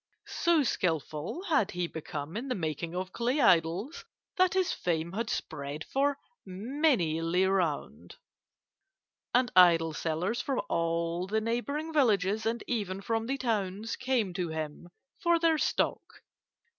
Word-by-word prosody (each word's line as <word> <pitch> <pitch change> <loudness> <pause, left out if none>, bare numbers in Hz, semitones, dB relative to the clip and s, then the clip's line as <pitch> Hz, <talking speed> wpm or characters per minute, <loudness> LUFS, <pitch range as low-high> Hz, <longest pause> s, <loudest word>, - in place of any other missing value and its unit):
So 335 -3 +2
skilful 165 - -2
had 275 - +2
he 180 0 -2
become 155 -1 -6
in 240 +5 -3
the 255 - -1
making 165 0 -3
of 185 +1 -4
clay 245 +5 0
idols 185 - +2 0.3
that 370 0 +3
his 375 -2 +2
fame 170 -1 -1
had 225 +4 -3
spread 145 +2 -4
for 280 +1 0 0.3
many 205 - 0
li 175 +3 +2
round, 180 -6 -1 1.2
and 250 0 +2
idol 165 -3 +6
sellers 175 +10 -1
from 270 0 -1
all 170 +1 0
the 215 +3 +1
neighbouring 280 +8 -2
villages, 215 -6 +2
and 230 +1 -1
even 195 -5 -2
from 225 +2 -1
the 270 +2 -1
towns, 215 -3 -2
came 250 -7 0
to 175 -2 -2
him 160 +2 -5 0.3
for 340 -1 +3
their 325 -2 +2
stock. 265 - -1
195 Hz, 140 wpm, -30 LUFS, 170-255 Hz, 1.2 s, idol